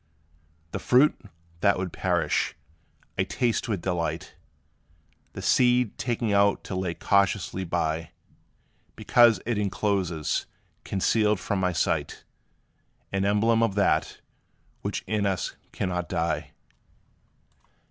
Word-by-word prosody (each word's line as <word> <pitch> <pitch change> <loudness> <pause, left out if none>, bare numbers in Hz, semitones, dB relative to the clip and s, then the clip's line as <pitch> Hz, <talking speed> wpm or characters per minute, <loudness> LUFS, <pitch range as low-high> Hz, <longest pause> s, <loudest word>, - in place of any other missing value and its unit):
The - - -3
fruit, 130 +5 +4 0.5
that 100 +1 +3
would 90 -2 -4
perish, 85 -4 0 0.6
I - - +4
taste 120 -2 -1
with 100 -6 -2
delight, 90 -3 -2 1.0
The - - -7
seed 125 -3 +3
taking 115 -3 -1
out 100 0 +3
to 95 - -5
lay 90 -2 -2
cautiously 100 -1 +1
by, 80 -2 -1 0.9
Because 120 -2 +5
it 115 -2 0
encloses, 95 -5 -1 0.4
concealed 105 +1 +1
from 100 0 -2
my 90 -1 +1
sight, 80 - -1 0.9
An 95 0 0
emblem 110 +3 +3
of 115 -4 +1
that, 100 - +1 0.6
which - - -3
in 105 -2 0
us 95 -2 -2 0.2
cannot 90 -3 -3
die. 85 +1 -1
100 Hz, 110 wpm, -26 LUFS, 90-110 Hz, 1.0 s, Because